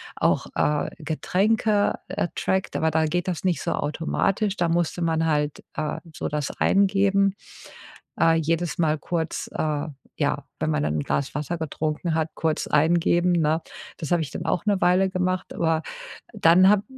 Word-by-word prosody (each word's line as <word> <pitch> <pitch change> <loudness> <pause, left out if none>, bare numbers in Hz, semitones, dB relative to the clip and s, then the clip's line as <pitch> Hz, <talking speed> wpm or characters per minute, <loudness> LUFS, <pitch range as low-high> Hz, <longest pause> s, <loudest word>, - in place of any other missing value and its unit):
auch, - - +1
äh, 150 0 +1
Getränke, 205 +6 +1
äh, - - -1
trackt, 190 0 -1
aber 160 0 +1
da 160 +1 +2
geht 175 +3 -1
das 175 -3 -3
nicht 180 -3 +1
so - - -1
automatisch. 190 +7 -1
Da 175 -2 +1
musste 170 +1 0
man 165 -1 +1
halt, 150 -2 0
äh, 155 -1 -2 0.2
so - - -3
das 150 -1 -2
eingeben 195 0 +3 0.9
äh, 165 - +5
jedes 165 +1 0
Mal 155 -2 +2
kurz, 165 +2 -3
äh, 150 0 -1 0.3
ja, - - -1
wenn - - 0
man 75 -1 0
dann 75 0 0
'n - - -2
Glas 140 - -2
Wasser 150 +4 -2
getrunken 160 +1 -2
hat, 160 0 0
kurz 160 -1 -1
eingeben, 170 +3 +3
ne? 160 -1 +2 0.4
Das 160 - -6
habe 175 - +3
ich 145 - -7
dann - - -5
auch 180 - -1
'ne 205 -3 +1
Weile 185 +2 +4
gemacht, 185 0 -1
aber 165 -1 +1 0.5
dann 185 -2 +5
habe 205 -1 +4
165 Hz, 170 wpm, -24 LUFS, 155-185 Hz, 0.9 s, äh